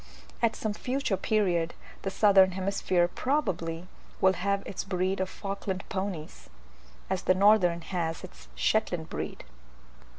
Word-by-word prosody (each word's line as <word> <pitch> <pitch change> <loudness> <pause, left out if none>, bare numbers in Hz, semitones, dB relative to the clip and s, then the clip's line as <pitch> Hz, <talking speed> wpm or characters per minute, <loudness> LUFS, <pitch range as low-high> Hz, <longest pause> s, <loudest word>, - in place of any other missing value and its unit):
At 230 -1 +2
some 215 -1 -2
future 255 -1 -1
period 180 -6 +1 0.3
the 195 - -2
southern 195 -1 +5
hemisphere 185 -2 +1
probably 180 - -1 0.3
will 190 0 +5
have 200 +1 -1
its 195 - -4
breed 190 0 -1
of 190 0 -1
Falkland 195 -1 -4
ponies, 190 -5 -5 0.6
as - - -1
the 185 - +3
northern 185 -4 +4
has 165 -2 -3
its - - -12
Shetland 175 - 0
breed. - - -5
190 Hz, 130 wpm, -29 LUFS, 175-200 Hz, 0.6 s, southern